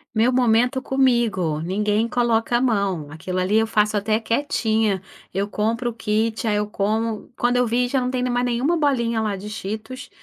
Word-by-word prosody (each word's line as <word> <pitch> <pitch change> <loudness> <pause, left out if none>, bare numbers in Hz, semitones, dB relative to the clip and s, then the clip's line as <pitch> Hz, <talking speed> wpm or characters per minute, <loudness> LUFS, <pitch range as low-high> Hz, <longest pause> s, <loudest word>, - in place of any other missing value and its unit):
Meu 225 +3 +3
momento 245 +1 +2
comigo. 235 - +1
Ninguém 210 +5 0
coloca 235 -1 +1
a - - 0
mão. 200 - 0
Aquilo 180 +4 -4
ali 190 +4 +2
eu 225 - +1
faço 210 -1 +1
até 215 +2 +1
quietinha. 220 -5 0 0.3
Eu 195 +2 -1
compro 230 +4 -1
o - - -11
kit, 225 0 -1
aí 210 - +2
eu 210 0 0
como. 215 +1 -2
Quando 245 +1 +1
eu 250 -1 +2
vi, 245 +2 +1
já 260 +1 0
não 250 - -1
tem 255 -1 -1
mais 245 0 0
nenhuma 250 +8 +1
bolinha 235 -7 +1
lá 210 -2 -1
de 200 +2 -8
Cheetos. 220 +4 -6
225 Hz, 190 wpm, -22 LUFS, 210-245 Hz, 0.3 s, Meu